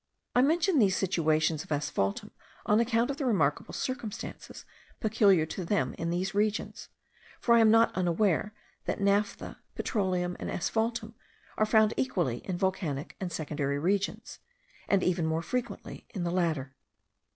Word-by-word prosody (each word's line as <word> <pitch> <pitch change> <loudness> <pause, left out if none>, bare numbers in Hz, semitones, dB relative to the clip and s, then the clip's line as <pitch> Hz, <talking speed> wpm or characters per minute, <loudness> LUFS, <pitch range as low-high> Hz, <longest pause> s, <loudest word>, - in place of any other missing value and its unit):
I 250 - +6
mention 325 +3 +3
these 195 -5 +3
situations 160 -4 +1
of - - -17
asphaltum 100 -9 -1 0.3
on 210 +1 +4
account 235 +2 +2
of 275 - -6
the 280 - -2
remarkable 150 - +1
circumstances 240 -5 -5 0.3
peculiar 205 -6 +4
to 180 +4 -5
them 200 +4 0
in 165 - -3
these 185 +3 -1
regions; 210 +1 -1 0.5
for 235 - +3
I 235 - +7
am 225 -1 +6
not 225 +1 +4
unaware 185 +2 +1 0.3
that - - -2
naphtha, 200 +1 0 0.2
petroleum, 180 -4 -1
and - - -4
asphaltum 225 +3 -1 0.4
are 215 - +2
found 220 0 +4
equally 175 - 0
in 185 -2 -4
volcanic 175 -7 -2
and 185 -2 -4
secondary 145 -3 -2
regions,* 195 +6 -1 0.5
and 195 -2 +2
even 175 -3 +1
more 160 +1 -1
frequently 240 0 -5
in 185 - -2
the 170 - -1
latter. 160 -7 -1
190 Hz, 150 wpm, -29 LUFS, 165-220 Hz, 0.5 s, I